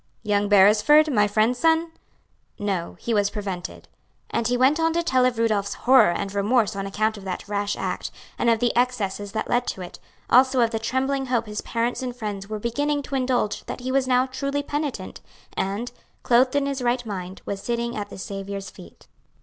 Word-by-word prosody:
"Young 205 -1 +1
Beresford, 210 +10 +5
my 210 -2 +4
friend's 220 +4 +1
son? 325 0 +2 0.7
No, 195 -5 -3
he 235 - -2
was 205 -2 +2
prevented." 195 -4 -6 0.4
And 235 - 0
he 245 0 +1
went 265 +5 +3
on 325 0 +2
to 340 +1 0
tell 260 -6 +3
of 250 -2 +1
Rudolph's 215 -3 0
horror 260 -5 +5
and 195 +3 -3
remorse 210 +1 +1
on 195 0 -3
account 215 +2 -1
of 200 - -10
that 185 +1 -5
rash 205 0 -1
act, - - -3 0.3
and 235 - +2
of 230 - +4
the 240 +1 0
excesses 210 -5 -1
that 220 - -2
led 245 +1 +1
to 190 - -4
it; 175 - -10 0.3
also 260 +1 +5
of 230 -1 +2
the 225 - -2
trembling 265 +4 -1
hope 240 -2 0
his 210 -1 -5
parents 235 +2 -2
and 250 -1 -4
friends 205 -4 -5
were 215 - -3
beginning 285 +6 -1
to 275 - -5
indulge 250 -5 0
that - - -6
he 255 +1 -3
was 265 -1 +1
now 255 0 +3
truly 275 +2 -3
penitent, 285 -10 -4 0.3
and, 205 +5 -2 0.3
clothed 250 +2 +3
in 285 -1 +2
his 275 -1 -2
right 245 0 0
mind, 190 -3 -6
was 200 -1 -4
sitting 235 +1 -2
at 205 -1 -4
the - - -9
Saviour's 195 0 -6
feet. 85 - -15
230 Hz, 200 wpm, -24 LUFS, 205-260 Hz, 0.7 s, Beresford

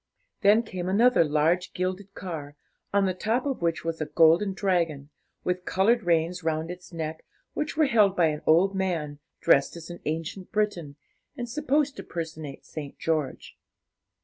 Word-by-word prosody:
Then 215 +3 +5
came 185 -4 -4
another 230 +1 +5
large 160 +4 +1
gilded 185 +2 -3
car, 150 -6 -6 0.4
on 200 0 +3
the 185 - +1
top 225 +8 -1
of 275 -7 -2
which 165 -1 -1
was 165 -1 -3
a 155 - -1
golden 170 +5 +4
dragon, 165 -7 -1 0.3
with 180 0 -1
coloured 225 +7 +2
reins 175 0 +1
round 160 +1 -1
its 180 +1 -10
neck, 160 -1 -5 0.3
which 300 0 -3
were 315 - +5
held 210 -7 +4
by 175 - +4
an 150 -1 -4
old 175 +5 +5
man, 165 -7 -2 0.2
dressed 140 +3 +4
as 170 +1 -9
an 175 - -8
ancient 165 +4 -4
Briton, 185 -9 -1 0.4
and 240 -1 -4
supposed 290 +2 0
to - - -6
personate 160 -4 -6
St. 145 -3 -8
George. 155 -5 -2
180 Hz, 165 wpm, -27 LUFS, 160-200 Hz, 0.4 s, Then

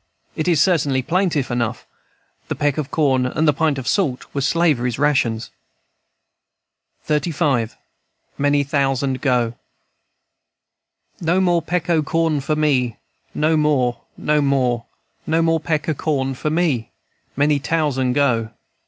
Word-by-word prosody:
It 155 - -2
is 170 -4 +3
certainly 145 -7 +2
plaintive 165 -5 0
enough. 120 -1 -2 0.6
The - - -3
peck 145 0 0
of 145 -2 -3
corn 130 -5 +2
and 150 +2 +1
pint 155 -2 +1
of 130 - -5
salt 145 -11 0
were 140 - -1
slavery's 135 -5 +1
rations. 125 -6 +1 1.6
XXXV. 150 -6 0 0.6
MANY 145 0 +2
THOUSAND 135 -2 0
GO. 125 -4 +1 1.7
"No 170 +2 +2
more 175 -2 +2
peck 170 0 -2
o' 165 -3 +3
corn 160 0 0
for 155 +3 -1
me, 135 -6 +1 0.4
No 155 +2 +2
more, 130 -6 +1 0.2
no 150 0 +1
more, 130 -4 +1 0.4
No 165 +1 +2
more 165 0 +2
peck 155 -2 -2
o' 160 - +1
corn 135 -3 -1
for 145 +4 -3
me, 155 -8 0 0.5
Many 145 +1 +2
tousand 140 -5 0
go. 125 -5 +1
145 Hz, 130 wpm, -20 LUFS, 130-160 Hz, 1.7 s, is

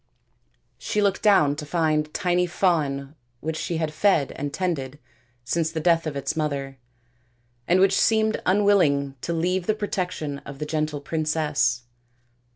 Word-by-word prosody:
She 210 - -2
looked 200 -2 +1
down 155 -9 +4
to 155 - -5
find 155 -1 0
a - - -24
tiny 180 0 0
fawn 150 -6 0 0.3
which 160 +4 -3
she 170 +1 -3
had 160 -1 -2
fed 160 -5 +2
and 145 0 -5
tended 150 -5 -3 0.5
since 160 +6 -1
the 165 - -3
death 165 0 +2
of 150 - -4
its 140 +2 -2
mother, 140 -3 -3 0.9
and 180 +2 +4
which 195 0 +4
seemed 220 -1 +2
unwilling 180 -9 +3
to - - -3
leave 175 +2 -1
the 215 - +2
protection 180 -8 -3
of 140 0 -10
the 150 - -4
gentle 155 -1 -2
princess. 150 -6 0
160 Hz, 155 wpm, -24 LUFS, 145-180 Hz, 0.9 s, down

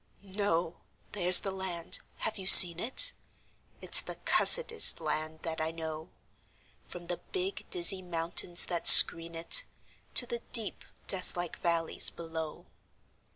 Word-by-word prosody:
No! 185 -4 -9 0.3
There's 180 -2 +4
the 195 - -11
land. 185 -3 -8 0.2
(Have 220 -2 -10
you 190 - -11
seen 175 -3 +8
it?) 265 - +2 0.7
It's - - +1
the - - -13
cussedest 475 -2 +1
land 155 0 -11
that 160 -1 -10
I 160 - -8
know, 160 0 -14 0.7
From 175 -1 -17
the 175 0 -11
big, 380 - -12
dizzy 280 - +1
mountains 175 0 -3
that 175 -2 -4
screen 165 0 +7
it 170 - 0 0.5
To - - +2
the 475 0 -11
deep, - - -3 0.2
deathlike 175 -2 -6
valleys 170 -2 0
below. 160 -2 -14
175 Hz, 130 wpm, -23 LUFS, 165-195 Hz, 0.7 s, seen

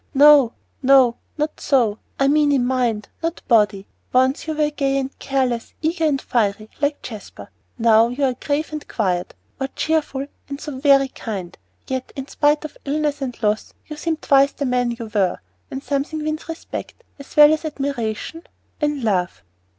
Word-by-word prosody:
"No, 285 -4 +7 0.3
no 260 -3 +5 0.2
not 300 +1 -2
so! 235 -7 +2 0.2
I 275 - +4
mean 295 0 +4
in 265 -3 +2
mind, 245 -5 0
not 330 +1 -3
body. 210 -4 +3 0.3
Once 260 +4 +2
you 315 - -2
were 300 0 +1
gay 275 -2 0
and 270 0 -3
careless, 255 -4 -1
eager 325 +1 +1
and 285 -3 +2
fiery, 215 -3 -1
like 285 0 0
Jasper; 200 - -9 0.3
now 225 0 +5
you 250 +4 -3
are 260 -2 +3
grave 295 +5 -2
and 305 - -6
quiet, 180 -5 -1 0.2
or 270 - -1
cheerful, 300 -4 0 0.2
and 280 0 -5
so 295 -4 -6
very 275 -1 +5
kind. 195 -9 -6 0.3
Yet, 260 -1 -4
in 270 0 -5
spite 295 +1 +2
of 310 - -9
illness 295 0 -1
and 255 -3 -4
loss, 210 0 0
you 305 - -7
seem 320 +1 -2
twice 275 -1 +4
the 285 - -3
man 250 -1 +1
you 235 -1 -5
were, 195 -4 +2 0.3
and 270 +1 -6
something 295 +2 -2
wins 310 +1 -4
respect, 330 +8 -7 0.2
as 280 - -12
well 300 +1 +9
as 310 - -2
admiration 275 -1 -3 0.4
and 295 -3 0
love." 185 - 0
275 Hz, 175 wpm, -21 LUFS, 235-295 Hz, 0.4 s, well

